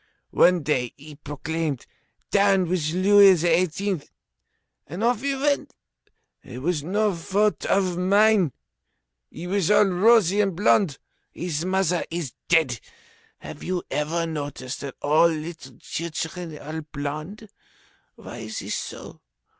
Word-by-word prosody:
One 180 -2 +4
day 125 -5 -1
he 150 +2 -12
exclaimed: 145 0 -4 0.5
Down 195 -2 +3
with 165 -3 -1
Louis 195 +2 +6
XVIII.! 175 +2 0 0.9
and 175 +9 -5
off 235 -1 +2
he 275 0 -1
went. 285 +1 -1 0.7
It 125 +2 -9
was 170 -2 0
no 205 +5 +1
fault 200 +5 0
of 185 -3 +1
mine. 200 -2 +4 0.8
He 170 - -9
was 190 -1 0
all 210 0 +6
rosy 200 +1 +4
and 195 -4 0
blond. 185 -5 +2 0.4
His 170 -1 -3
mother 185 -2 +1
is 165 -6 -4
dead. 155 -9 +2 0.6
Have - - -9
you 180 -1 -2
ever 165 +3 -1
noticed 145 -5 -5
that 140 -2 -6
all 155 +3 +5
little 155 -5 -6
children 165 0 -5
are 155 +2 -6
blond? 155 +8 -6 0.7
Why 120 - -10
is 110 -1 -6
it - - -6
so? - - -6
170 Hz, 130 wpm, -24 LUFS, 150-195 Hz, 0.9 s, Louis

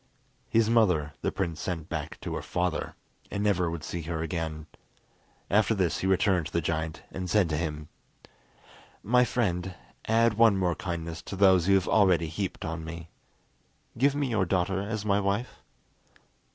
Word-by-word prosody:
His 115 -1 +3
mother 90 -11 +2
the - - 0
prince 85 -5 -3
sent 80 -4 -4
back - - -5
to - - -4
her - - -3
father, 90 -1 -2 0.3
and 100 - -2
never 95 -5 +2
would 80 -2 -5
see 85 - -4
her 80 0 -3
again. 80 -2 -4 0.8
After 105 +2 +3
this 95 -4 0
he 95 - -1
returned 95 -3 +2
to - - -13
the 85 - +2
giant, 80 0 -3
and 90 -1 -5
said 105 -3 +3
to 75 - 0
him: 75 -1 -3 1.2
"My 125 +4 +4
friend, 95 -7 -1 0.3
add 115 0 +4
one 115 -4 +6
more 90 -2 +1
kindness 85 -1 -5
to - - -7
those 95 -3 +5
you 100 - +5
have 95 - +1
already 90 -6 +3
heaped 95 +4 -4
on 80 0 -4
me. 85 0 -8 0.9
Give 140 +4 +2
me 145 -1 0
your 110 -6 +1
daughter 95 +1 0
as 105 +1 -4
my 100 -1 +2
wife." 100 +5 -2
90 Hz, 170 wpm, -28 LUFS, 85-105 Hz, 1.2 s, one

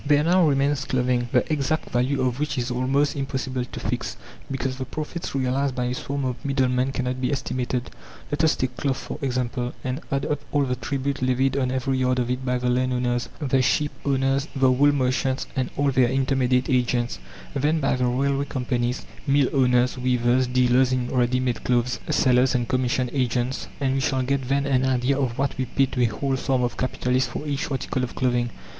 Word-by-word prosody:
There 145 0 +3
now 175 +1 +4
remains 140 +1 +1
clothing, 125 -1 0
the - - +3
exact 150 +2 -1
value 130 +3 +1
of 125 0 -1
which 150 -2 -1
is 125 0 -1
almost 135 +4 +1
impossible 130 -2 -2
to - - -8
fix, - - -3 0.3
because 135 -1 -2
the 130 - -2
profits 155 +4 -5
realized 135 +1 0
by 125 - -1
a 125 - -1
swarm 140 +2 -3
of 125 -1 -4
middlemen 130 -1 +1
cannot 130 -1 -2
be 125 - 0
estimated. 130 -2 -2 0.4
Let 145 +2 0
us 160 - +4
take 130 -1 -2
cloth, 135 -2 0
for - - -7
example, 125 -2 -2
and 130 +4 -3
add 135 +1 0
up 145 -2 -1
all 145 -1 +2
the 125 -2 -1
tribute 140 +1 -3
levied 130 +1 +1
on 130 -2 +1
every 130 +1 -1
yard 130 0 +2
of 125 -1 0
it 125 +1 -2
by 125 -1 0
the 125 0 -2
landowners, 125 -1 0
the 135 -3 +2
sheep 145 +3 +1
owners, 135 +1 +1
the 130 -1 +4
wool 145 +3 +4
merchants, 130 -1 0
and 130 -2 -1
all 145 -1 +2
their 125 -2 +3
intermediate 130 -1 +1
agents, 125 -2 0 0.3
then 150 +4 +1
by 135 - +1
the 125 -1 +1
railway 140 +3 +1
companies, 125 -2 -2 0.2
mill 140 -1 +3
owners, 125 -1 +3
weavers, 125 0 +2
dealers 125 +1 +3
in 125 -1 0
ready 125 0 +1
made 125 -3 -1
clothes, 125 0 +1
sellers 125 +1 +3
and 120 -1 0
commission 130 0 0
agents, 125 -1 -1
and 135 -2 +1
we 135 - +1
shall 130 -1 0
get 135 0 -1
then 140 0 +1
an 130 -2 +2
idea 130 +1 +1
of 125 -4 -1
what 140 0 0
we 130 - +1
pay 135 +3 +2
to 125 -1 -3
a - - +5
whole 135 +5 -1
swarm 130 -1 0
of 120 - -1
capitalists 130 0 0
for 150 - -5
each 145 +1 -2
article 130 -1 -2
of 125 - -4
clothing. 120 -2 +1
130 Hz, 200 wpm, -24 LUFS, 125-135 Hz, 0.4 s, a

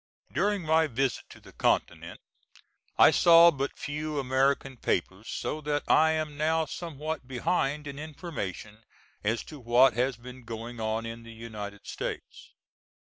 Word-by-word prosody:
During 200 +5 +1
my 160 0 +3
visit 135 0 -1
to - - -13
the - - -16
Continent - - -1 0.8
I - - +8
saw 170 0 +7
but 140 -2 -4
few 150 +1 -4
American 135 0 +1
papers 95 +1 -2
so 155 - -3
that 145 -1 -1
I 160 0 +5
am 155 -2 -3
now 160 +1 +1
somewhat 155 -4 -5
behind 140 +2 -1
in 140 0 -7
information 115 - -6 0.4
as 110 +3 0
to 150 - -11
what 120 +2 +5
has 125 +1 0
been 125 +1 -11
going 115 +1 -7
on 110 +1 -2
in 115 0 -6
the 115 0 -12
United 105 -3 -8
States. - - -6
135 Hz, 145 wpm, -28 LUFS, 115-155 Hz, 0.8 s, I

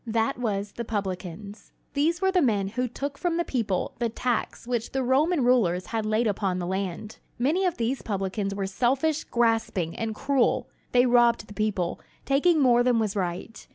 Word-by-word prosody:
That 225 +4 0
was 205 -4 -2
"the 235 - -5
publicans." 200 -1 -5 0.2
These 330 +6 +1
were 380 - +4
the 370 -1 +3
men 205 -7 +1
who 250 +4 -1
took 280 +4 -5
from 345 -2 0
the 345 - 0
people 215 -8 -1
the 235 -1 +1
tax 240 +1 -2
which 240 -2 -2
the 265 0 0
Roman 280 +5 +2
rulers 185 -8 +3
had 220 -2 -2
laid 215 +2 +1
upon 195 -3 0
the 180 - -3
land. 190 +3 -4 0.2
Many 315 +10 +2
of 350 - -2
these 240 +3 -1
publicans 195 0 -2
were 195 -1 -2
selfish, 265 +10 +1
grasping, 225 -8 0
and 225 -1 -3
cruel. 275 0 +1 0.2
They 245 0 +5
robbed 240 -3 +4
the 205 - -12
people, 205 -5 -1 0.3
taking 305 +4 +3
more 245 -3 +5
than 245 -1 +3
was 215 -2 0
right. 185 +3 -4
230 Hz, 185 wpm, -26 LUFS, 200-260 Hz, 0.3 s, They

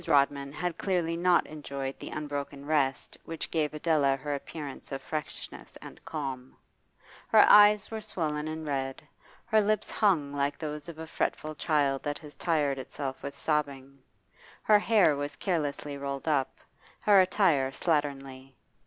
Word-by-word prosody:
Rodman 140 0 +2
had 170 +4 -3
clearly 175 -4 0
not 175 +1 +3
enjoyed 140 -3 -6
the - - -7
unbroken 145 -1 -5
rest 140 -3 0
which 165 -1 -6
gave 155 -2 0
Adela 150 -3 +2
her 145 +2 -4
appearance 145 0 -7
of 135 - -3
freshness 155 +1 -7
and - - -12
calm; 135 -4 -5 0.7
her - - +7
eyes 210 0 +7
were 220 -1 -4
swollen 155 -6 -3
and 160 0 -5
red, 135 -2 -3 0.4
her 220 -2 +4
lips 215 +1 0
hung 165 -10 +2
like 145 0 -1
those 150 0 -6
of 165 - -9
a 160 - -6
fretful 155 -1 -2
child 145 -3 +1
that 145 -1 -3
has 150 -2 -12
tired 145 -5 0
itself 135 0 -5
with 140 0 -7
sobbing, 140 -3 -2 0.6
her 210 -1 +6
hair 205 -9 +4
was 145 +1 -4
carelessly 145 -5 -2
rolled 140 +1 -5
up, 140 -4 +1 0.4
her 200 -2 +6
attire 180 -8 +3
slatternly. 135 -3 -2
150 Hz, 150 wpm, -29 LUFS, 140-165 Hz, 0.7 s, her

